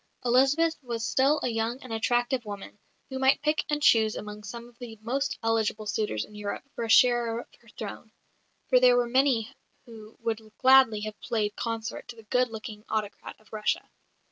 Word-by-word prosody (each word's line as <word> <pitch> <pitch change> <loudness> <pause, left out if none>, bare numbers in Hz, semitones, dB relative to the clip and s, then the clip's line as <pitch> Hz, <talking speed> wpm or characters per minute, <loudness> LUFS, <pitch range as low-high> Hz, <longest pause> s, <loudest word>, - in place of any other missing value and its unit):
Elizabeth 275 +7 +3
was 235 -3 -4
still 280 +3 +3
a - - +1
young 225 +2 -2
and 250 -3 -7
attractive 240 +2 0
woman, 205 -1 -8 0.3
who 265 - -3
might 265 +2 +3
pick 305 +1 +1
and 295 0 -1
choose 220 -4 +4
among 210 0 -7
some 235 +2 -8
of 240 0 -21
the 235 -3 -9
most 270 +5 -1
eligible 220 -1 0
suitors 210 - -1
in - - -18
Europe 205 -1 -5
for - - -4
a 225 - -4
sharer 235 -1 +4
of - - -16
her 235 - -20
throne; 220 +1 -7 0.6
for 250 - +5
there 250 -1 +6
were 245 -1 +2
many 255 -3 +2 0.3
who 225 -2 -13
would 230 -1 -2 0.2
gladly 260 -5 +6
have 215 0 -6
played 210 -3 -1
consort 225 -1 -4
to 240 - -9
the 225 - -14
good 250 +3 +1
looking 215 -1 -8
autocrat 215 -2 -4
of 215 - -24
Russia. 210 -1 -1
230 Hz, 190 wpm, -27 LUFS, 215-250 Hz, 0.6 s, there